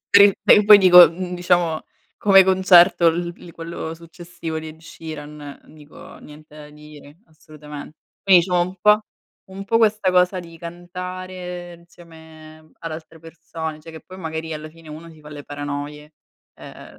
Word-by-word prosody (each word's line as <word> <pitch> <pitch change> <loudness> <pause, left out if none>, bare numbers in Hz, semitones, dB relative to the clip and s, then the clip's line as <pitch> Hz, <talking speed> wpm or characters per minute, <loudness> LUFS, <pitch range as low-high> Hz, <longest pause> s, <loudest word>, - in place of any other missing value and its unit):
Per 200 - +6
i 200 - +4
per 210 - +5
poi 210 0 +9
dico, 180 -3 +8
mhmm, 180 +1 -7
diciamo, 175 -2 0 0.4
come 195 -2 +6
concerto, 185 -2 +4
il 170 +1 0
il 170 - -14
quello 165 -1 -7
successivo 170 -1 -9
di 160 0 -8
Ed 155 +1 -14
Sheeran, 150 -3 -11
dico, 150 -1 -15
niente 150 0 -16
da 150 -1 -12
dire, 150 0 -16
assolutamen. 150 -2 -13 0.3
Quindi 190 -3 +5
diciamo 180 -1 -1
un 180 +2 -3
po' 210 0 +4 0.5
un 195 +1 -9
po' 225 +3 +1
questa 215 -4 +1
cosa 180 +1 +1
di 165 -1 -14
cantare 180 +1 -8
insieme 160 -2 -17 0.2
ad 165 -1 -7
altre 160 0 -11
persone, 165 -1 -8
cioè 165 +2 -13
che 160 - -11
poi 185 0 -14
magari 160 -1 -6
alla 155 0 -8
fine 165 0 -18
uno 155 +2 -11
si 155 -1 -18
fa 150 - -13
le 145 -1 -10
paranoie. 145 +1 -7 0.4
Ehm, - - -14
165 Hz, 165 wpm, -20 LUFS, 155-180 Hz, 0.5 s, poi